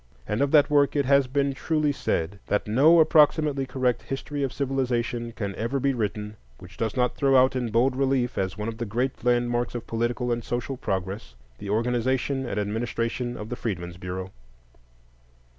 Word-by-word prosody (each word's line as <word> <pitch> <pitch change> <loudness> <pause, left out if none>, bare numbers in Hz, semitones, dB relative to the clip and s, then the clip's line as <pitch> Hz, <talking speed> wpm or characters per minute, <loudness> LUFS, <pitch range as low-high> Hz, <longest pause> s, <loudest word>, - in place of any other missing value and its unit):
And 105 +5 -1
of 140 - +2
that 145 0 +5
work 145 -1 +3
it 140 -2 +2
has 140 0 +4
been 140 +1 0
truly 150 +1 0
said 100 - -2
that 105 - 0
"no 145 +10 +5
approximately 150 -3 +4
correct 130 -1 0
history 140 +2 -5
of 135 -2 0
civilization 125 -3 -1
can 100 -3 -4
ever 115 +7 -2
be 140 +1 +1
written 105 -2 -3 0.2
which 90 +4 -13
does 115 0 -3
not 125 -1 +1
throw 135 -2 +2
out 130 +1 +4
in 125 -2 -1
bold 120 +4 +2
relief, 130 -2 +1
as 95 +1 -2
one 105 +1 -4
of 115 0 -5
the 120 - -2
great 125 +6 -2
landmarks 120 0 +1
of 120 - -5
political 120 +2 -1
and 120 0 -1
social 120 +3 -3
progress, 95 - -4 0.2
the 100 - -7
organization 125 +4 0
and 105 - -2
administration 115 +3 -2
of 105 - -7
the 125 - -3
Freedmen's 90 -7 -4
Bureau." 90 +1 -6
120 Hz, 180 wpm, -25 LUFS, 110-135 Hz, 0.2 s, that